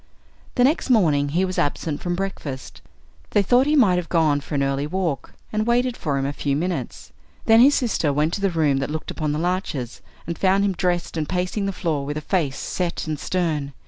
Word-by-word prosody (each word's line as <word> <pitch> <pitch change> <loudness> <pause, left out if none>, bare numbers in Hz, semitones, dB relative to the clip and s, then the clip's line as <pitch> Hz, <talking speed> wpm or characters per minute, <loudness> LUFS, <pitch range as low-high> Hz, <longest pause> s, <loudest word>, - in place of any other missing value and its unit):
The 245 - +4
next 285 +2 +2
morning 155 - +3
he 175 +6 +1
was 185 0 -3
absent 145 +1 -1
from 175 -1 -1
breakfast. 160 -8 -5 0.6
They 205 - +5
thought 245 +7 +4
he 300 - +3
might 205 -11 +5
have 175 -2 -3
gone 155 -4 +2
for 145 - -6
an 140 - +2
early 140 +1 -1
walk, 175 -4 -2 0.2
and 215 +1 0
waited 245 +1 +2
for 145 -3 -2
him 135 - -1
a 140 - -2
few 140 -1 -1
minutes. 160 -5 -3 0.3
Then 225 0 +6
his 280 +3 +6
sister 210 - +1
went 150 +4 +1
to 200 - -2
the 200 - +2
room 155 -5 +2
that 135 +1 -2
looked 155 +1 -4
upon 155 -2 -2
the 150 - -1
larches, 165 -8 -2 0.2
and 170 +1 -5
found 195 +1 +3
him 200 - +1
dressed 175 -2 -1
and 155 -2 -2
pacing 185 +3 -1
the - - 0
floor 160 -6 -2
with 145 +2 -4
a - - -3
face 150 -5 -1
set 175 -2 -3
and 155 -2 -3
stern. 155 -6 -1
170 Hz, 220 wpm, -23 LUFS, 145-195 Hz, 0.6 s, Then